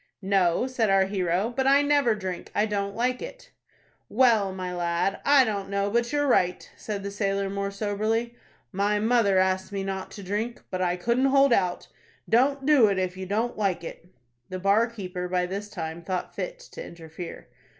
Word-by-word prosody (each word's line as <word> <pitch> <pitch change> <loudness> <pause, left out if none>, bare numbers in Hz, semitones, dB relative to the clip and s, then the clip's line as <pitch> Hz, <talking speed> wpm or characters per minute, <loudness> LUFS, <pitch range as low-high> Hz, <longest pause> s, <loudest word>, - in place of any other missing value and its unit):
"No," 190 +1 +2
said 255 -5 0
our 195 0 +4
hero; 190 +3 -1
"but 265 0 +1
I 280 +1 +5
never 285 -6 +3
drink. 190 -4 -5
I 210 - +3
don't 200 -2 -2
like 250 +2 0
it." - - -9 0.6
"Well, 225 -5 +3
my 185 -1 -5
lad, 175 +2 -1
I 280 -2 +6
don't 200 -3 -3
know 200 0 -1
but 235 +2 +1
you're 290 0 +1
right," 180 -9 +1
said 205 -2 -5
the 200 - -4
sailor, 195 -1 -1
more 200 0 -2
soberly. 215 +3 -1 0.4
"My 205 +1 +1
mother 220 -3 +3
asked 190 +1 +1
me 195 -1 -3
not 190 -1 -4
to 200 - -9
drink; 210 +5 -3
but 185 - -2
I 180 -1 +1
couldn't 235 +8 +1
hold 275 -1 +5
out. 180 -5 0 0.4
Don't 270 +4 +2
do 285 -7 +6
it, 200 -2 0
if 185 -1 -1
you 190 0 -6
don't 220 +4 -1
like 190 -5 0
it." 170 +1 -9 0.4
The 185 - -4
bar 200 +5 +3
keeper 185 -6 -5
by 180 0 0
this 200 +3 -5
time 165 -3 -6
thought 180 +1 -4
fit - - -5
to - - -7
interfere. 165 0 -9
200 Hz, 190 wpm, -26 LUFS, 185-235 Hz, 0.6 s, I